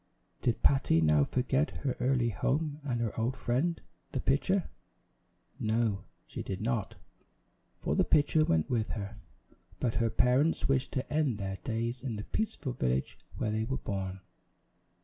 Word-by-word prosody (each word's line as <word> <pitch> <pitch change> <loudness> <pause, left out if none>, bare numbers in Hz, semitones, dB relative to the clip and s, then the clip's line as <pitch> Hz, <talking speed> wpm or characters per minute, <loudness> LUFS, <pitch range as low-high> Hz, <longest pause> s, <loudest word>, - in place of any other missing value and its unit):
Did 120 -2 0
Patty 135 -12 +4
now 75 -2 +5
forget 130 - +1 0.2
her 130 - +1
early 125 -2 +2
home 145 - 0
and 125 -4 -1
her 115 -3 -1
old 125 +3 0
friend, 135 +7 0 0.3
the 135 - 0
pitcher? 165 +9 +2 0.9
No, 110 -2 0 0.2
she - - -6
did 95 -1 -4
not, 110 -2 -1 0.8
for - - -1
the - - +4
pitcher 155 +1 +4
went 80 - +2
with 115 -3 0
her; 100 0 -6 0.6
but 120 -3 +1
her 115 - +3
parents 125 +8 +3
wished 135 -1 +1
to 130 - -2
end 150 -7 +2
their 95 -1 -3
days 115 +1 -2
in 125 -4 -3
the 105 - -4
peaceful 155 - -2
village 65 - -1 0.2
where 105 - 0
they 110 +1 0
were 130 +4 -1
born. 95 -2 -4
120 Hz, 155 wpm, -31 LUFS, 105-135 Hz, 0.9 s, now